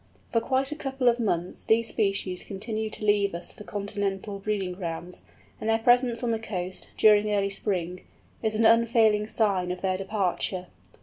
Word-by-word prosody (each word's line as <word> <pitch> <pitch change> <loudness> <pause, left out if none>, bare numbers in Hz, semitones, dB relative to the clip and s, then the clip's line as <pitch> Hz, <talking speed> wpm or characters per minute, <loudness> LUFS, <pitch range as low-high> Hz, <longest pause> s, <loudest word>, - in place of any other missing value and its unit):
For 230 - +2
quite 265 +3 0
a - - -2
couple 270 -3 -2
of 240 0 +1
months 180 -6 -1
these 225 +1 +2
species 195 -4 -1
continue 215 +2 -4
to 215 - -5
leave 205 -3 +2
us 175 - -7
for - - -12
Continental 200 0 -3
breeding 195 -2 -2
grounds, 175 -1 -6 0.4
and 220 - -2
their 225 - +4
presence 245 +1 +3
on 235 - +1
the 225 - 0
coast, 185 -4 -4
during 210 -1 +5
early 200 -1 +1
spring, 180 -3 -2 0.4
is 220 -1 0
an 225 +1 +2
unfailing 225 -2 +4
sign 200 -5 +1
of 180 0 -5
their 185 -1 0
departure. 190 -2 -1
210 Hz, 175 wpm, -27 LUFS, 190-225 Hz, 0.4 s, during